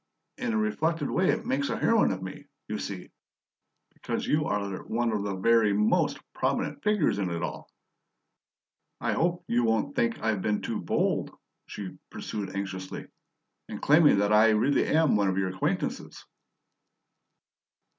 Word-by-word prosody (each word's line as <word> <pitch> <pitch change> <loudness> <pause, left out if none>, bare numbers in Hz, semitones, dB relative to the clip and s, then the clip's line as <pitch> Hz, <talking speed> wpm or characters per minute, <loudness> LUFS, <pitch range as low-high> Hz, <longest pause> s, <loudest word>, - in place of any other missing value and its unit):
In 250 -2 -1
a - - +1
reflected 165 -8 0
way 185 0 +2
it 230 0 0
makes 270 +3 0
a - - -1
heroine 230 -2 +3
of 95 -1 -4
me, 95 0 -8 0.2
you - - -3
see, - - -6 0.8
because - - -4
you 150 0 +1
are 100 -2 -2
one 115 +1 0
of 105 -2 -1
the 100 -1 -2
very 110 +1 +3
MOST 105 +1 +2 0.2
prominent - - -1
figures 210 - +2
in 95 -2 -1
it 85 0 -3
all. 85 - -5 1.3
I - - 0
hope 175 +1 0
you 120 +1 +2
won't 110 -1 0
think 115 0 +1
I've 110 -3 0
been 105 +1 -1
too - - -3
bold," - - 0 0.4
she 95 -3 -8
pursued 100 -3 -5
anxiously, 95 -1 -5 0.6
"in - - -5
claiming 150 -4 +5
that 100 +1 +2
I 110 +1 +6
really 120 +6 +2
am 155 -4 +3
one 100 -1 +2
of 95 -1 0
your 95 -1 +1
acquaintances?" 95 +1 -3
110 Hz, 155 wpm, -28 LUFS, 100-160 Hz, 1.3 s, I